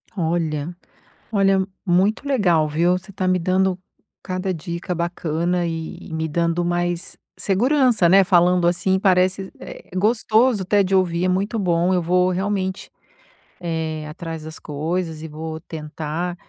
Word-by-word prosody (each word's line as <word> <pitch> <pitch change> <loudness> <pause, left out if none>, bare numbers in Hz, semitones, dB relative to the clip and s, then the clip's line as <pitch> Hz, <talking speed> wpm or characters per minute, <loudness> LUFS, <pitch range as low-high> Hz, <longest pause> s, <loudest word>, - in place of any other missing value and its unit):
Olha 165 -2 -1 0.6
olha, 195 -2 +3 0.2
muito 195 +9 +2
legal, 175 - +3
viu, 165 +4 +2
você 190 +2 -12
tá 185 -1 -3
me 185 0 +2
dando 185 +1 +1 0.4
cada 185 0 -3
dica 170 +2 -4
bacana 170 0 -1
e 165 -1 -5
me 160 0 -1
dando 170 +2 0
mais 175 0 -2 0.2
segurança, 235 - +3
né, 195 +1 +7
falando 175 -1 +4
assim 190 +2 +1
parece 190 0 +2
é - - -10
gostoso 220 +2 +2
até 200 +2 +3
de 190 +1 -2
ouvir, 180 -2 +2
é - - +2
muito 200 +5 0
bom, 180 -2 +1
eu 180 - +2
vou 180 +2 +2
realmente, 190 0 -2 0.7
eh, 160 -3 -3
atrás 165 0 -7
das 155 0 -8
coisas 160 +2 -3
e 160 - -6
vou 160 +1 -6
tentar 160 +2 -5
180 Hz, 140 wpm, -21 LUFS, 165-190 Hz, 0.7 s, né